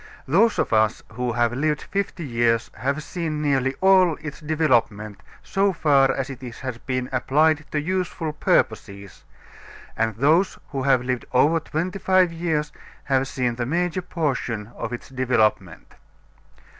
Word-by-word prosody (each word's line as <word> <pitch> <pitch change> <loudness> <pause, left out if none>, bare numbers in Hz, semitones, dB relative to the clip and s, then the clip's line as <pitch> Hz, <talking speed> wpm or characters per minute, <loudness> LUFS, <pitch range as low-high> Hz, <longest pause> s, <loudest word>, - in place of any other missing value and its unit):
Those 205 - +3
of - - 0
us 110 -1 +2
who 125 +1 -2
have 120 -1 +1
lived 150 +3 -1
fifty 195 -4 -3
years 115 -2 +1
have 140 +3 -2
seen 160 -3 -4
nearly 135 -3 0
all 185 -3 +5
its 150 -1 -8
development 120 -10 0 0.2
so 195 0 +1
far 140 -5 +3
as 135 - -2
it 130 - -10
has 125 -1 -7
been 130 0 -3
applied 150 +4 +2
to 150 - 0
useful 165 -1 -2
purposes, 100 -8 -1 0.7
and 110 -1 0
those 160 - +2
who 135 -2 -3
have 130 -2 +3
lived 125 -1 -2
over 150 +6 +4
twenty 175 +5 -4
five 185 -2 +3
years 160 -3 -1 0.3
have 135 -1 +1
seen 125 -2 -2
the 120 - -2
major 175 +4 -1
portion 130 - -3
of 115 - -5
its 120 - -6
development. 130 -5 0
140 Hz, 145 wpm, -23 LUFS, 125-160 Hz, 0.7 s, all